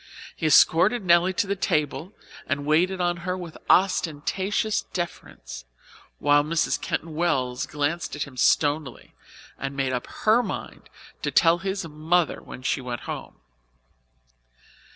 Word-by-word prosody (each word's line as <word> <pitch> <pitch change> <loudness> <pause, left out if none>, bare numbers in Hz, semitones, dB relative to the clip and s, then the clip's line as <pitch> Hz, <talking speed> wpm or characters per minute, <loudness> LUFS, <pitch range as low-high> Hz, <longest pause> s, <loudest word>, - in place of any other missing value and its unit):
He 160 - -1
escorted 180 - +5
Nelly 175 +1 +5
to 185 - 0
the 200 0 -1
table 165 0 -1 0.3
and 140 +1 -2
waited 175 +5 +2
on 175 -1 0
her 180 +2 -3
with 175 -3 -8
ostentatious 190 +3 +1
deference, - - -7 0.5
while 145 0 +4
Mrs. 150 -2 0
Keyton 160 0 -3
Wells 130 -7 0
glanced 150 +3 -2
at 145 - -2
him 140 -3 -11
stonily 145 +1 +1 0.5
and 135 0 -4
made 135 -1 0
up 125 - -3 0.2
her 220 +3 +5
mind - - -7 0.3
to - - -1
tell 170 0 +4
his 190 -1 -3
mother 160 +2 0
when 130 - -11
she 135 - 0
went 125 -1 -5
home. - - -7
160 Hz, 135 wpm, -25 LUFS, 145-180 Hz, 0.5 s, escorted